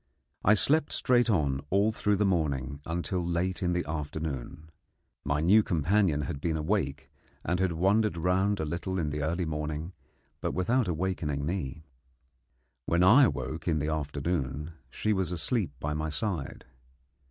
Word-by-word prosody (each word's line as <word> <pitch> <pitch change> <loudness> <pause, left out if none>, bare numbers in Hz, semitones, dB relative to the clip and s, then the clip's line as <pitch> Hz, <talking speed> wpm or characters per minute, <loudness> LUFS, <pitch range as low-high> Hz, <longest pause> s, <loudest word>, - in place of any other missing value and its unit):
I 105 - +6
slept 150 +8 +2
straight 120 -1 +3
on 70 -9 +1
all 100 +3 +3
through 105 -1 +1
the 105 +1 +1
morning 70 -6 -1
until 85 +2 -1
late 90 +3 -1
in 90 -1 +1
the 90 - -1
afternoon. 75 -1 -5 0.5
My 70 +1 0
new 100 +7 +6
companion 85 -2 +1
had 70 0 -4
been 80 0 0
awake, 75 -4 -2 0.3
and 90 +3 0
had 95 -2 +1
wandered 100 +3 +2
round 95 +4 +1
a 80 - -1
little 95 +4 -3
in 75 -4 -1
the 75 0 -3
early 85 +4 -1
morning, 75 +2 -4 0.5
but - - -3
without 115 +5 +1
awaking 80 -5 -2
me. 80 -3 -4 1.0
When 85 +1 +3
I 125 +10 +8
awoke 80 -8 -3
in 80 -2 +2
the 75 +1 -1
afternoon 75 -1 -2 0.2
she 110 - 0
was 95 -3 -1
asleep 90 - 0
by 75 +1 -2
my 75 +1 -2
side. 80 -2 -3
85 Hz, 155 wpm, -29 LUFS, 75-95 Hz, 1.0 s, I